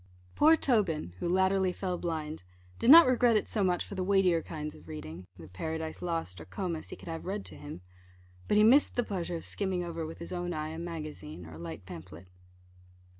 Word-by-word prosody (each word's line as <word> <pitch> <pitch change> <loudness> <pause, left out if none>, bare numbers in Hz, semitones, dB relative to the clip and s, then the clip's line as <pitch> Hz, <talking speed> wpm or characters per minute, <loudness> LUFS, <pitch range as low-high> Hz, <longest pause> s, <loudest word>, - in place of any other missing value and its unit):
Poor 315 +2 +6
Tobin, 190 - +1
who 170 - -1
latterly 190 +1 +3
fell 180 0 -3
blind, 160 - -4 0.4
did 230 - +2
not 330 +4 +11
regret 245 -2 +4
it - - -1
so 210 - 0
much 180 -2 +1
for - - -9
the 190 -1 -2
weightier 185 -3 +3
kinds 150 -2 -6
of - - -16
reading 90 - -8
the 80 -3 -11
Paradise 160 - -4
Lost, 165 - -3
or - - -9
Comus, 165 - -4
he - - -6
could - - -14
have 165 -1 -5
read 200 +1 -3
to - - -8
him 145 -11 -9 0.7
but 210 - +3
he 210 - +6
missed 260 +7 +5
the 245 - +2
pleasure 180 -5 -3
of 165 - -6
skimming 190 -3 -2
over 170 -1 -4
with 160 +1 -6
his 170 - -7
own 175 0 -2
eye 155 0 -3
a 160 +1 -6
magazine, 155 - -7
or 80 - -11
a 80 - -10
light 85 +2 -7
pamphlet. 85 -1 -10
170 Hz, 215 wpm, -30 LUFS, 150-190 Hz, 0.7 s, not